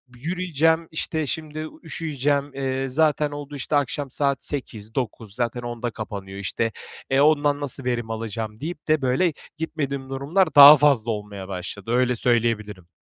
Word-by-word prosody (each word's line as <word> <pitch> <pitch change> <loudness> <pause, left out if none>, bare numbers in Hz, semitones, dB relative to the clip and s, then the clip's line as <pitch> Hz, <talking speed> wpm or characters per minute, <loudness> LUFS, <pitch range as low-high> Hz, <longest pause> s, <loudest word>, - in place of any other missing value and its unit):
"Yürüyeceğim, 165 +1 0
işte, 160 -1 -2
şimdi 155 +1 -4
u - - -16
üşüyeceğim, 145 -3 -1
eee, 135 0 -2
zaten 150 +1 +2
oldu, 145 0 -7
işte, 145 +2 -2
akşam 145 0 0
8-9, 125 -6 -3
zaten 120 0 -2
10'da 120 0 -4
kapanıyor, 100 -3 -7
işte. 115 +3 -1 0.4
E, 135 +1 +3
ondan 145 -1 +3
nasıl 140 -1 -2
verim 120 -2 -2
alacağım?" 110 -1 -5
deyip 160 0 -6
de 155 -2 +3
böyle 135 +6 +2 0.2
gitmediğim 140 -4 -3
durumlar 145 +5 0
daha 145 +1 +12
fazla 130 -6 +3
olmaya 105 -2 -6
başladı. 95 +3 -6
Öyle 125 0 +2
söyleyebilirim. 110 -6 0
135 Hz, 145 wpm, -23 LUFS, 115-150 Hz, 0.4 s, daha